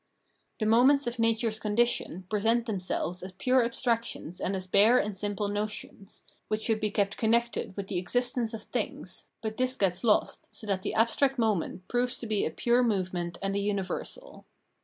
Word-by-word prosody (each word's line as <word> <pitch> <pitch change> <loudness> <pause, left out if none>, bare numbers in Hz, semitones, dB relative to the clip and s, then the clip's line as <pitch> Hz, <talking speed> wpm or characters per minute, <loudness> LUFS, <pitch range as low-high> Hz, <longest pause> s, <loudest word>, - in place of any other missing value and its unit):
The 215 - -1
moments 255 +6 +5
of 240 0 -3
natm 230 0 +2
es' 220 0 -1
condition 210 -4 0
present 225 +3 +1
themselves 185 -4 -2
as 185 +1 -8
pure 255 +6 +3
abstractions 230 -7 -2
and 195 - -1
as 185 -1 -4
bare 205 +6 +5
and 210 -4 0
simple 205 +1 -2
notions, 205 -1 -4 0.2
which 215 0 -2
should 220 -2 +1
be 215 -1 0
kept 200 -1 0
con 220 - +1
nected 235 -4 0
with 200 - -3
the 190 -2 -2
existence 245 +4 0
of 220 - -8
things, - - -4 0.2
but 220 0 -3
this 255 0 +1
gets 190 -4 0
lost, 220 -3 +1
so - - -7
that 195 -2 -1
the - - -3
abstract 260 +5 +2
moment 205 -5 -1
proves 245 +1 0
to - - -7
be 215 -2 0
a - - -2
pure 240 +1 +2
movement 185 -6 -1
and 195 0 -1
a - - +1
universal. 200 - -4
215 Hz, 185 wpm, -29 LUFS, 195-235 Hz, 0.2 s, moments